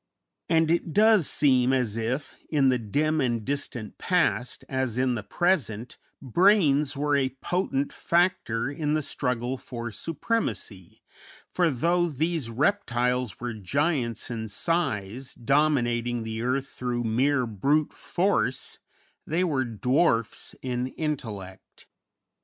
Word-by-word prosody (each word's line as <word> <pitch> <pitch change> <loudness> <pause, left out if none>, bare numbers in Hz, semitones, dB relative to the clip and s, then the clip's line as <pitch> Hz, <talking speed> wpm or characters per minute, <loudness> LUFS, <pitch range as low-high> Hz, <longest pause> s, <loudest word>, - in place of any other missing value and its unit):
And 160 -1 +3
it 170 -1 0
does 215 -5 +5
seem 130 -3 +3
as 125 -5 0
if 120 +6 -2 0.2
in 140 -4 +3
the 125 -1 +2
dim 150 +8 0
and 120 -4 0
distant 130 -5 -4
past, 175 -8 0
as 130 -3 -2
in 130 0 +2
the 115 - -2
present, 120 - -1 0.2
brains 150 - +3
were 145 0 +1
a 135 -2 +2
potent 160 -6 -1
factor 155 -9 +1
in 150 +1 -1
the 155 - 0
struggle 125 -1 -2
for 120 -2 -6
supremacy; 135 - -3 0.5
for, 175 -2 +3
though 170 +6 +1
these 155 -2 -1
reptiles 125 - 0
were 120 -1 -3
giants 120 - -1
in 110 -1 -4
size, 130 - -2
dominating 120 -3 +1
the 110 0 -4
earth 130 +3 -1
through 120 -1 -3
mere 130 +4 +2
brute 140 +8 +1
force, 135 - -1 0.5
they 165 +4 +1
were 140 -7 +1
dwarfs 120 0 0
in 125 -1 -1
intellect. 115 - -6
130 Hz, 125 wpm, -26 LUFS, 120-155 Hz, 0.5 s, does